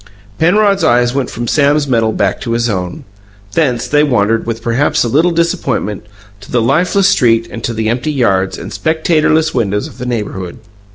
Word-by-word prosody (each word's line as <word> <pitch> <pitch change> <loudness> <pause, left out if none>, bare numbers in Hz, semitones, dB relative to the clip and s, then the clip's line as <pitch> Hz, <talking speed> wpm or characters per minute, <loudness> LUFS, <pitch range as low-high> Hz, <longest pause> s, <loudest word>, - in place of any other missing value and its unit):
Penrod's 195 +2 +3
eyes 120 -4 +3
went 135 -2 -1
from 120 +1 -5
Sam's 145 +2 +2
medal 115 -4 +1
back 100 -2 -1
to 115 - -3
his 115 0 0
own; 90 -3 -4 0.5
thence 125 -4 0
they 145 +3 +3
wandered, 115 -6 +1
with 115 0 -4
perhaps 120 +5 +1
a - - -1
little 155 +9 +2
disappointment, 160 - -2 0.3
to 100 - -15
the 125 - +2
lifeless 180 - +2
street 115 - +2
and 115 - -7
to - - -1
the 110 -1 -2
empty 120 +6 -1
yards 95 -9 0
and - - -8
spectatorless 160 -1 +1
windows 105 -4 -1
of - - -15
the 125 - -5
neighbourhood. 105 -5 -4
120 Hz, 180 wpm, -14 LUFS, 115-155 Hz, 0.5 s, Penrod's